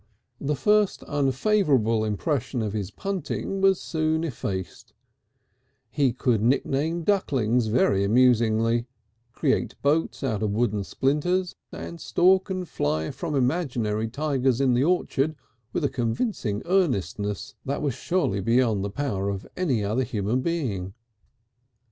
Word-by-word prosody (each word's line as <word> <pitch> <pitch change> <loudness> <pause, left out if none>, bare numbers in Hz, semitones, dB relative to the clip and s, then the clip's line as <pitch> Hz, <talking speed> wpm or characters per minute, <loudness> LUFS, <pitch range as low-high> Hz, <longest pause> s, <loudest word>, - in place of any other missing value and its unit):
The 145 +1 -1
first 210 +6 +2
unfavourable 135 - +2
impression 120 +3 -1
of 105 -2 -3
his 100 -4 -3
punting 195 - -3
was 195 -1 +4
soon 160 0 -1
effaced; 95 - -5 1.0
he 140 -4 +2
could 120 -3 +1
nickname 140 +7 +1
ducklings 125 - +1
very 105 -3 +2
amusingly, 115 +1 +3 0.4
create 135 +2 -1
boats 150 +2 +1
out 110 -6 -1
of 105 -2 0
wooden 105 -2 0
splinters, 175 - 0 0.2
and 170 -1 -8
stalk 185 +4 +3
and 185 -2 -3
fly 80 - -1
from 140 +3 -4
imaginary 125 -6 0
tigers 135 -1 0
in 135 -2 +3
the 125 +2 +3
orchard 155 -3 +1 0.4
with 170 - -2
a - - +4
convincing 115 - -2
earnestness 115 - 0
that 140 +2 -3
was 140 -4 0
surely 165 - 0
beyond 115 -2 +2
the 100 - -2
power 100 -5 -2
of 100 -1 -4
any 135 - 0
other 110 +6 0
human 110 +2 -1
being. 115 - -2
130 Hz, 130 wpm, -25 LUFS, 110-160 Hz, 1.0 s, was